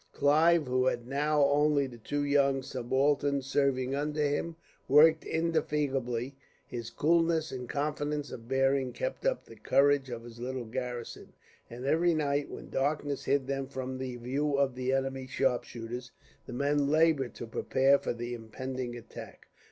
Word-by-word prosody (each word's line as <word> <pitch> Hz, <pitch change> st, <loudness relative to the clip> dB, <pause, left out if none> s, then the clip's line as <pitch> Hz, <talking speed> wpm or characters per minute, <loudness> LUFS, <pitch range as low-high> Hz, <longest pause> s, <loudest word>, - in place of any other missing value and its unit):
Clive, 155 Hz, +3 st, +4 dB
who 130 Hz, 0 st, +1 dB
had 120 Hz, -2 st, -1 dB
now 145 Hz, +2 st, +2 dB
only 145 Hz, 0 st, +3 dB
the 120 Hz, -3 st, -10 dB
two 145 Hz, +6 st, -2 dB
young 140 Hz, -2 st, +2 dB
subalterns 135 Hz, +2 st, 0 dB
serving 135 Hz, -1 st, +1 dB
under 150 Hz, +2 st, -1 dB
him, 160 Hz, +3 st, -2 dB, 0.3 s
worked 155 Hz, +3 st, +6 dB
indefatigably. 140 Hz, -6 st, -1 dB, 0.3 s
His 120 Hz, -2 st, -6 dB
coolness 165 Hz, 0 st, +2 dB
and 125 Hz, -2 st, -6 dB
confidence 150 Hz, 0 st, -2 dB
of 115 Hz, -1 st, -9 dB
bearing 135 Hz, 0 st, +1 dB
kept -, -, -3 dB
up -, -, -1 dB
the -, -, -13 dB
courage 140 Hz, -1 st, +3 dB
of 120 Hz, -1 st, -6 dB
his 115 Hz, 0 st, -11 dB
little 125 Hz, 0 st, -4 dB
garrison, 120 Hz, +1 st, -6 dB, 0.4 s
and 120 Hz, +2 st, -8 dB
every 165 Hz, +4 st, +3 dB
night, 145 Hz, -2 st, 0 dB
when -, -, -9 dB
darkness 145 Hz, 0 st, -1 dB
hid 140 Hz, -1 st, +1 dB
them 135 Hz, 0 st, -3 dB
from 130 Hz, -1 st, -5 dB
the 130 Hz, -1 st, -4 dB
view 140 Hz, +5 st, -1 dB
of 140 Hz, -2 st, +2 dB
the 130 Hz, +1 st, -2 dB
enemy's 135 Hz, -1 st, -2 dB
sharpshooters, 125 Hz, -2 st, -2 dB, 0.4 s
the -, -, -7 dB
men 140 Hz, +2 st, +1 dB
laboured 155 Hz, -4 st, +2 dB
to -, -, -6 dB
prepare 135 Hz, +4 st, +2 dB
for -, -, -2 dB
the 120 Hz, +1 st, -5 dB
impending 120 Hz, +2 st, -5 dB
attack. 120 Hz, -1 st, -11 dB
135 Hz, 155 wpm, -30 LUFS, 125-145 Hz, 0.4 s, worked